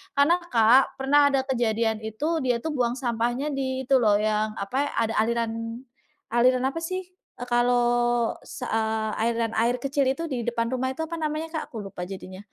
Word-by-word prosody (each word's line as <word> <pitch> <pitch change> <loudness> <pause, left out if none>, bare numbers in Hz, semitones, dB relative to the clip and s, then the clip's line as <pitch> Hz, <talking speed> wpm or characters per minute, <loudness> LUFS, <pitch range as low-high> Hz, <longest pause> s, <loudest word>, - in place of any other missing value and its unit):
Karena, 285 +5 +5 0.2
Kak, 235 +3 +5
pernah 285 +2 +4
ada 270 -1 +2
kejadian, 230 -4 0
itu 290 +10 -2
dia 250 -2 +1
tuh 320 - -2
buang 245 -3 0
sampahnya 245 +3 -1
di 265 -1 -2
itu 265 +1 +3
loh, 215 -4 +4
yang 215 0 0
apa 255 +9 -1
ya, - - -5 0.2
ada 225 - -3
aliran 230 0 0 0.8
aliran 250 +2 +3
apa 275 +5 -3
sih, 370 +2 -3
eee, 360 -8 -12
kalau 240 -1 +2 0.2
sa - - -6
eee, 220 -1 0 0.2
aliran 230 -1 0
air 235 +2 +2
kecil 275 +1 0
itu 270 +5 -1
di 245 -3 -2
depan 235 0 -1
rumah 260 0 -1
itu 320 - -3
apa 335 +1 -6
namanya, 310 +1 -2
Kak? 315 - -2
Aku 220 -4 -6
lupa 195 -2 -7
jadinya 185 -1 -8
245 Hz, 185 wpm, -25 LUFS, 225-270 Hz, 0.8 s, Karena